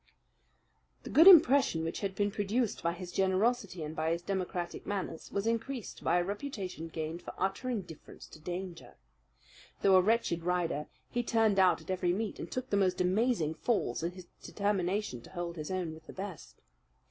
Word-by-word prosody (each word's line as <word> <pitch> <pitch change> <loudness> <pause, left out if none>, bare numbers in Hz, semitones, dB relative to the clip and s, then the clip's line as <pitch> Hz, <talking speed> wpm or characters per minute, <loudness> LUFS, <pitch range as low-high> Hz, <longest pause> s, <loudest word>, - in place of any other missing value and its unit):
The - - -7
good 325 +5 +7
impression 280 - +7
which 165 - -3
had 195 -2 -3
been 205 0 +1
produced 210 +3 -1
by 170 0 0
his 175 0 -8
generosity 195 -1 +1
and 155 +1 -6
by 160 0 0
his 170 +1 -2
democratic 180 -2 -3
manners 190 -5 -4
was 200 +1 -1
increased 230 +1 -3
by 175 - +3
a 175 - +2
reputation 195 - -5
gained 160 +1 -5
for - - -9
utter 195 +7 -1
indifference 190 -10 -6
to - - -13
danger. 175 +1 -6 0.9
Though 195 -1 +6
a - - +7
wretched 210 -4 +1
rider, 170 -4 -1 0.2
he 245 - 0
turned 225 -4 +2
out 185 -1 +4
at - - -6
every 180 -1 +1
meet, 215 +2 -3
and - - -6
took 255 0 -4
the 200 - +3
most 190 -2 +2
amazing 185 -3 +2
falls 180 - -1
in 170 +2 -2
his 185 -1 -11 0.2
determination 200 - -1
to - - -14
hold 175 -2 -5
his 155 -2 -6
own 185 -4 -2
with 160 0 -14
the - - -9
best. 190 -4 -8
190 Hz, 180 wpm, -31 LUFS, 170-210 Hz, 0.9 s, good